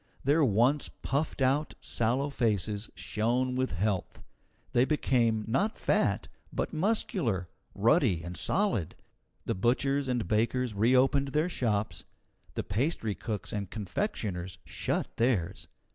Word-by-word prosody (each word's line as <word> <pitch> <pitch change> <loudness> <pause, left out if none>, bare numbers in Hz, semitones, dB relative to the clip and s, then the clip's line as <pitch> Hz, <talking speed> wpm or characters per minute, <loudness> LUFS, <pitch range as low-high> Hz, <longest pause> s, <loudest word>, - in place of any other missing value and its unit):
Their 150 +4 +4
once 125 +5 +3
puffed 140 0 -2
out, 140 +4 +1
sallow 130 +5 0
faces 105 -4 0
shone 125 +4 0
with 130 -3 0
health; 95 +1 -2 0.5
they 120 - +5
became, 120 -6 +2
not 200 - +1
fat, - - +1 0.2
but - - -2
muscular, 155 - 0 0.3
ruddy, 110 - +3
and 85 +1 -6
solid. 185 - 0 0.5
The - - 0
butchers 135 +7 +1
and 125 -7 -1
bakers 115 +3 +1
reopened 130 +6 +3
their 155 +4 +2
shops; 110 - -1 0.5
the - - -1
pastry 115 - -1
cooks 105 0 -4
and 100 -3 -3
confectioners 95 - -3
shut - - -3
theirs. 115 -8 0
120 Hz, 120 wpm, -30 LUFS, 105-140 Hz, 0.5 s, they